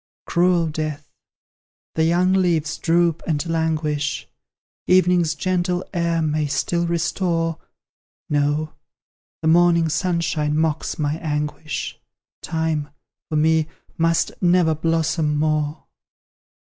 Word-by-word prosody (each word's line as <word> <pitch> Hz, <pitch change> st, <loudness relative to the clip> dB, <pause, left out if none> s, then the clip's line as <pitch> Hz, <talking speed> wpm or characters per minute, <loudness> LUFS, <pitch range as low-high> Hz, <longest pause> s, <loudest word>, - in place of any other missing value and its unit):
Cruel 175 Hz, -1 st, +2 dB
Death! 155 Hz, -1 st, -4 dB, 0.8 s
The 160 Hz, -, +1 dB
young 180 Hz, +3 st, +3 dB
leaves 170 Hz, -5 st, +1 dB
droop 170 Hz, -1 st, +2 dB
and 150 Hz, -2 st, 0 dB
languish; 155 Hz, -3 st, -1 dB, 0.6 s
Evening's 180 Hz, -3 st, +3 dB
gentle 180 Hz, 0 st, -1 dB
air 170 Hz, -2 st, 0 dB
may 155 Hz, -1 st, 0 dB
still 170 Hz, +5 st, 0 dB
restore 165 Hz, 0 st, -1 dB, 0.7 s
No! 150 Hz, +1 st, 0 dB, 0.7 s
the -, -, +1 dB
morning 170 Hz, 0 st, +4 dB
sunshine 160 Hz, -3 st, 0 dB
mocks 160 Hz, -1 st, -1 dB
my 150 Hz, 0 st, -1 dB
anguish 150 Hz, -1 st, -3 dB, 0.4 s
Time, 160 Hz, -2 st, -2 dB, 0.4 s
for 155 Hz, -, -2 dB
me, 160 Hz, 0 st, +3 dB, 0.3 s
must 165 Hz, 0 st, +1 dB
never 175 Hz, -2 st, +4 dB
blossom 160 Hz, -1 st, 0 dB
more! 155 Hz, 0 st, 0 dB
160 Hz, 100 wpm, -22 LUFS, 155-170 Hz, 0.8 s, morning